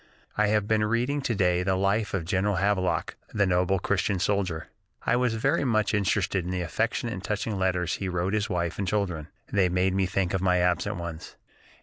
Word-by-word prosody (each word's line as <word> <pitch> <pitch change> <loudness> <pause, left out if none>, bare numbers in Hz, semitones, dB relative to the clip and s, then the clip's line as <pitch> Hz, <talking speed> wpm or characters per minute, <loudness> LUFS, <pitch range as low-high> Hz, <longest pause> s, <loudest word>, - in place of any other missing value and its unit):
I 105 0 +3
have 105 -1 +1
been 110 0 +2
reading 120 +6 0
to 120 -4 -1
day 90 -2 +2
the 95 +1 +1
life 100 +2 +1
of 90 -4 -2
General 95 +3 +1
Havelock, 95 -1 0 0.2
that 100 -2 +3
noble 90 +1 +2
Christian 100 +2 0
soldier. 95 -4 -1 0.4
I - - +3
was 125 -2 +1
very 140 +8 +1
much 110 -5 +1
interested 95 -2 +1
in 90 - -5
the 90 -1 -1
affectionate 115 +6 -1
and 95 - -6
touching 105 -1 -2
letters 90 -2 0
he 95 - -3
wrote 90 +2 -1
his 110 +1 0
wife 85 -2 -2
and 100 - -1
children; 90 -6 -1 0.3
they 95 -3 +3
made 90 +1 +1
me 95 -1 +1
think 95 -1 -1
of 95 - 0
my 90 -1 +3
absent 90 +3 +1
ones.... 85 -3 -7
95 Hz, 205 wpm, -27 LUFS, 90-105 Hz, 0.4 s, I